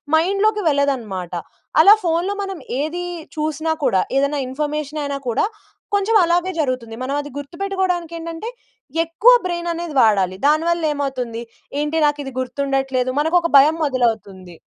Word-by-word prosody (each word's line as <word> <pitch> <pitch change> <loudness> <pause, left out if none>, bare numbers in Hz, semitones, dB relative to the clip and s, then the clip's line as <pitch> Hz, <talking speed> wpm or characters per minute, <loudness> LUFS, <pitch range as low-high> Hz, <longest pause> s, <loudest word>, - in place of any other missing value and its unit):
మైండ్‌లోకి 400 +6 +2
వెళ్ళదన్నమాట. 240 - -1 0.5
అలా 400 +5 +9
ఫోన్‌లో 345 +3 0
మనం 390 -3 -5 0.2
ఏది 340 +4 -3 0.3
చూసినా 315 +1 -1
కూడా, 190 - +3 0.2
ఏదైనా 280 +1 +1
ఇన్ఫర్మేషన్ 300 +2 -3
అయినా 280 -1 -3
కూడా, 230 - +1 0.5
కొంచెం 405 +3 +1
అలాగే 350 +2 +1
జరుగుతుంది. 255 -6 -2
మనం 270 +2 -2
అది 290 - -9
గుర్తుపెట్టుకోవడానికి 350 +2 -2
ఏంటంటే, 335 +6 -6 0.6
ఎక్కువ 380 +10 +5 0.2
బ్రెయిన్ 345 -1 -3
అనేది 335 -1 -5
వాడాలి. 195 -4 +2
దానివల్ల 330 +3 +2
ఏమవుతుంది 255 -5 -3 0.4
ఏంటి 300 +2 -1
నాకు 295 0 +1
ఇది 270 - -6
గుర్తుండట్లేదు. 265 0 -1
మనకు 320 +4 +1
ఒక 335 - 0
భయం 295 +4 +6
మొదలవుతుంది. 220 - -2
295 Hz, 135 wpm, -20 LUFS, 260-340 Hz, 0.6 s, అలా